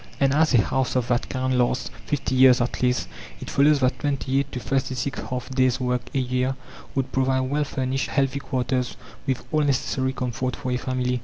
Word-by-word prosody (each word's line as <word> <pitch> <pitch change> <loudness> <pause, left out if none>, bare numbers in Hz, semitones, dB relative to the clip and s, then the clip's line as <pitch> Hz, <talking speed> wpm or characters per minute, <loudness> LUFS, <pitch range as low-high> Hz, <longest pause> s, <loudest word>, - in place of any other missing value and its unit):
And 135 0 +3
as 155 +2 +3
a 115 - +6
house 130 +6 -1
of 125 -1 0
that 120 0 0
kind 130 -1 0
lasts 125 +1 0 0.2
50 140 -2 -1
years 130 -1 +6
at 120 0 -2
least, 125 - +1 0.3
it - - -7
follows 145 0 +4
that 130 0 +1
28 140 -1 0
to 125 - -3
36 130 +1 -2
half 125 -1 -3
days' 130 -1 +2
work 125 -1 0
a - - +3
year 130 0 0 0.4
would 135 -1 -1
provide 130 0 +2
well 140 +3 0
furnished, 130 -3 -2
healthy 135 0 +1
quarters, 130 -2 -2 0.3
with 130 -1 -1
all 155 -1 +2
necessary 130 -2 0
comfort 125 0 -2
for 130 - -4
a 125 - +1
family. 125 0 -1
130 Hz, 190 wpm, -24 LUFS, 125-135 Hz, 0.4 s, a